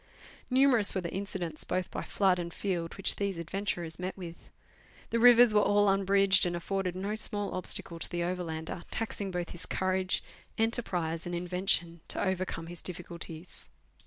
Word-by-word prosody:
Numerous 255 -6 +5
were 190 - 0
the 170 - -5
incidents, 190 -5 -3
both 180 0 -2
by - - -4
flood 190 -3 +1
and 170 -1 -4
field, 175 -3 -3
which 195 - +1
these 200 -3 -1
adventurers 170 -1 -3
met 185 +2 -4
with. 170 -3 -9 0.6
The 230 - +1
rivers 240 -1 +8
were 210 - +5
all 205 0 +3
unbridged, 195 0 +4
and 175 - -2
afforded 185 +1 -2
no 195 +3 -3
small 205 -1 +1
obstacle 175 -2 -1
to - - -4
the 175 -1 -2
overlander, 170 -2 -4
taxing 215 -3 -3
both 175 -1 -4
his 175 +1 -7
courage, 185 0 0 0.3
enterprise, 180 -8 -1
and 175 - -3
invention 175 -1 -1
to - - 0
overcome 185 -3 -2
his 175 0 -7
difficulties. 170 -1 -5
185 Hz, 160 wpm, -30 LUFS, 170-200 Hz, 0.6 s, rivers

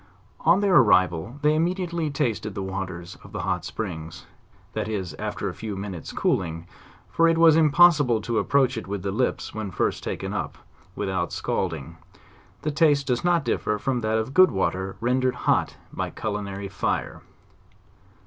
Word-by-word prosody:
On 170 +5 +4
their 195 -3 +4
arrival 95 - +3
they 150 0 +4
immediately 170 0 -1
tasted 115 -8 -2
the 100 - -3
waters 95 -2 -6
of - - -14
the - - -3
hot - - -1
springs, 85 -5 -6 0.5
that - - -2
is, 100 -5 -3
after 105 -1 -3
a 90 - -3
few 110 0 -6
minutes' 95 -4 -6
cooling, 80 -2 -1 0.4
for 165 - +3
it 165 0 +3
was 165 -2 +7
impossible 150 -6 +5
to 115 +1 -1
approach 130 -2 +2
it 110 - -5
with 100 -2 -4
the 100 - -1
lips 125 +6 -1
when 110 -2 -4
first - - -1
taken - - -4
up, - - -4 0.4
without 95 -3 -2
scalding: - - -3 0.7
the 150 - 0
taste 145 -2 +3
does 125 -2 0
not 175 -4 +2
differ 105 -2 0
from 125 +3 -1
that 110 0 +1
of 110 +4 -3
good 185 +2 +7
water 95 0 -1
rendered 130 +2 +1
hot - - +1 0.2
by - - -3
culinary 100 -1 -4
fire. 95 - -2
110 Hz, 165 wpm, -25 LUFS, 95-150 Hz, 0.7 s, was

